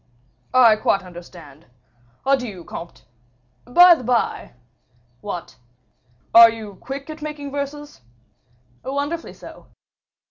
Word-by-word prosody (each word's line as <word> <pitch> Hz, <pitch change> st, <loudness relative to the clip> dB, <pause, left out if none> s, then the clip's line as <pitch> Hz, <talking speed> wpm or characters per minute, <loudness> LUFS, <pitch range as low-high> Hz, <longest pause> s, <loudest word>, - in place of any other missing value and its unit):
"I 235 Hz, -4 st, +6 dB
quite 195 Hz, -2 st, 0 dB
understand. 170 Hz, -5 st, -13 dB, 0.6 s
Adieu! 250 Hz, -10 st, -1 dB
comte. 170 Hz, +1 st, -10 dB, 0.6 s
By 350 Hz, +8 st, +7 dB
the 310 Hz, -, -4 dB
by 245 Hz, -1 st, -1 dB, 0.3 s
" 120 Hz, 0 st, -39 dB
"What?" 180 Hz, -8 st, -7 dB, 0.8 s
"Are 230 Hz, 0 st, +10 dB
you 215 Hz, -4 st, -9 dB
quick 275 Hz, +2 st, -7 dB
at 310 Hz, 0 st, -11 dB
making 295 Hz, -2 st, -6 dB
verses?" 285 Hz, -, -6 dB, 0.8 s
"Wonderfully 285 Hz, +5 st, -4 dB
so." -, -, -14 dB
235 Hz, 105 wpm, -21 LUFS, 180-285 Hz, 0.8 s, Are